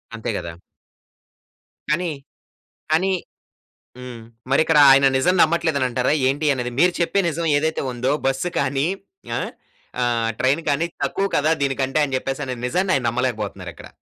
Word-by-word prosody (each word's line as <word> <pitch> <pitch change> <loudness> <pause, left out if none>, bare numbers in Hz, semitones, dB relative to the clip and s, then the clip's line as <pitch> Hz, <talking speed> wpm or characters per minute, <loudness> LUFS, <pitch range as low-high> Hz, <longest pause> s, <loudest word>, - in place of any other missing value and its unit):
అంతే 115 - -5
గదా! 85 - -6 1.4
కానీ, 170 +2 0 0.8
కానీ 185 +4 +2 0.9
హ్మ్. 125 -2 -8 0.3
మరిక్కడ 160 +2 +4
ఆయన 135 +1 +6
నిజం 180 +8 +2
నమ్మట్లేదని 160 -4 +2
అంటారా? 125 +2 0 0.2
ఏంటి 145 +3 -1
అనేది? 125 -2 -3
మీరు 180 +2 +4
చెప్పే 175 +3 +1
నిజం 165 +1 -3
ఏదైతే 160 +2 -1
ఉందో, 125 +2 -1
బస్సు 135 +6 0
కానీ 140 +2 0 0.5
ఆ! - - -1 0.6
ఆహ్, 115 -2 0
ట్రైను 140 +6 +1
కానీ 145 +4 +1 0.2
తక్కువ 195 - -1
కదా 155 +2 +2
దీనికంటే, 135 0 -1
ఆయన 145 -2 0
చెప్పేసనే 135 0 -4
నిజాన్ని 185 +9 0
ఆయన 130 - -1
నమ్మలేకపోతున్నారిక్కడ. 105 -7 -4
135 Hz, 135 wpm, -21 LUFS, 125-160 Hz, 1.4 s, ఆయన